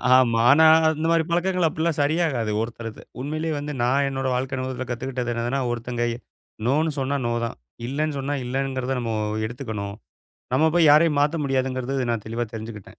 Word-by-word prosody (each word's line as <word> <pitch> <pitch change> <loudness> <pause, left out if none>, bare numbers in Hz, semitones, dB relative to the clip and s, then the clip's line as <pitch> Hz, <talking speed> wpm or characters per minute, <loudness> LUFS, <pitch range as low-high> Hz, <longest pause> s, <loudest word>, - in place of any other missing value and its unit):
ஆமா. 120 -3 +4
ஆனா 160 +3 +6 0.3
அந்த 155 +1 -3
மாரிப் 165 0 +2
பழக்கங்கள் 180 0 +2
அப்டிலா 160 +2 0
சரியாகாது. 145 -8 +1
ஒருத்தருக்கு 115 -1 -6 0.2
உண்மையிலேயே 155 +3 -2
வந்து 150 +1 -5
நா 120 - +2 0.2
என்னோட 135 -1 -2
வாழ்க்கைல 130 0 -2
முதல்ல 130 -1 -4
கத்துக்கிட்டது 125 0 -3
என்னன்னா, 120 +4 -1
ஒருத்தங்க 120 0 -3 0.6
"நோனு" 155 +4 +2
சொன்ன 140 +1 0
"நோ" 120 - 0
தான். 115 - -5 0.3
இல்லன்னு 150 +3 -1
சொன்னா 140 +2 -2
இல்லங்கறத 130 0 -2
நம்ம 115 -1 -2 0.3
எடுத்துக்கணு. 110 -4 -5 0.7
நம்ம 155 +5 +4
போய் 165 -3 +5
யாரையும் 150 -1 +5
மாத்த 150 +3 +2
முடியாதுங்கறத 130 0 -1
நா - - +1
தெளிவா 115 +1 -2
தெரிஞ்சுக்கிட்டேன். 110 -2 -7
135 Hz, 155 wpm, -24 LUFS, 120-150 Hz, 0.7 s, ஆனா